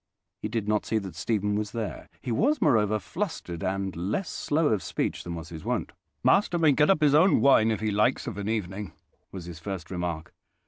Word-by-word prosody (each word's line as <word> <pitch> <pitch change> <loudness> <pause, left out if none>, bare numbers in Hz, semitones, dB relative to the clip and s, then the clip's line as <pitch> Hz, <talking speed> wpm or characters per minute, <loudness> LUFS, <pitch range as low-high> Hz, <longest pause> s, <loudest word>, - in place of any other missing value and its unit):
He - - -2
did 110 -1 -3
not 105 0 +1
see 110 - -1
that 95 -4 -4
Stephen 105 +4 -1
was 105 -1 -2
there: 115 -3 -5
he 125 - -3
was, 285 - +2
moreover, 110 -2 +3
flustered 105 - -5
and 95 0 -2
less 100 - -2
slow 155 +1 +1
of 105 -4 +1
speech - - -2
than 85 -1 -5
was 85 0 -7
his 80 -2 -8
wont. - - -2 0.3
"Master 195 -3 +3
may 160 -3 +5
get 150 +2 +3
up 190 -5 +4
his 145 -2 +5
own 165 +6 +5
wine, 115 -5 +5
if 110 -1 -1
he 110 -1 0
likes, 105 +7 +2
of 110 -6 -5
an 100 +1 -3
evening," 105 -2 -3 0.4
was 90 -3 -7
his 85 -2 -8
first 90 0 -6
remark. 85 -3 -4
105 Hz, 215 wpm, -27 LUFS, 95-130 Hz, 0.4 s, may